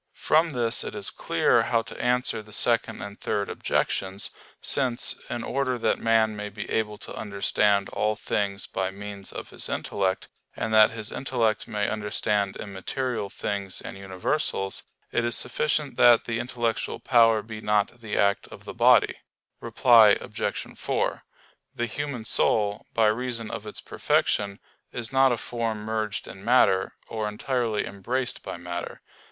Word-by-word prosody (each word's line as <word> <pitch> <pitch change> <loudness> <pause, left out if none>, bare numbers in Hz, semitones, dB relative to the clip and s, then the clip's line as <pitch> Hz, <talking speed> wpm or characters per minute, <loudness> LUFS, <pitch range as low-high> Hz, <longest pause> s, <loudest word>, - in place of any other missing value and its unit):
From 160 +2 +3
this 120 -5 +2
it - - -6
is - - -3
clear - - +2
how 115 -1 +1
to - - -8
answer 125 -2 +1
the 105 0 -16
Second 115 +2 +1
and 100 +1 -9
Third 100 -1 -1
objections: 95 +1 -1 0.3
since, 125 -4 +1
in 120 -1 -3
order 130 -2 -1
that 115 - +1
man 110 -1 +3
may 105 0 -5
be 105 +1 -7
able 105 -1 -1
to - - -9
understand 100 -1 +1
all 105 0 0
things 100 -2 -1
by 95 0 -2
means 100 0 -8
of - - -8
his - - +2
intellect, 95 -1 -1 0.3
and 110 - -2
that 110 0 +7
his 110 -2 -5
intellect 115 -5 0
may 105 -1 -1
understand 105 -1 -1
immaterial 105 +3 -4
things 100 -2 -2
and - - -7
universals, 95 +2 -1 0.3
it 120 - +1
is 120 0 +1
sufficient 145 +3 -1
that 120 -1 +7
the 115 -1 -2
intellectual 120 -2 -2
power 115 -3 +4
be 110 0 -8
not 105 +3 +1
the 110 -3 -4
act 100 0 +2
of - - -13
the - - -7
body. - - +5 0.4
Reply 115 -5 +6
Obj. - - -4
4: - - -1 0.5
The 120 - -1
human 130 -1 -4
soul, 105 -2 +1
by 115 - +4
reason 115 +1 0
of 110 - -6
its 105 - -6
perfection, 100 -1 0 0.3
is 120 0 -4
not 135 0 +5
a 120 - +1
form 115 -2 -3
merged 110 -1 -2
in 95 - -10
matter, 105 -6 +3
or 110 -1 -3
entirely 115 0 -1
embraced 125 +6 -3
by - - -6
matter. 85 0 -6
110 Hz, 160 wpm, -26 LUFS, 100-120 Hz, 0.5 s, that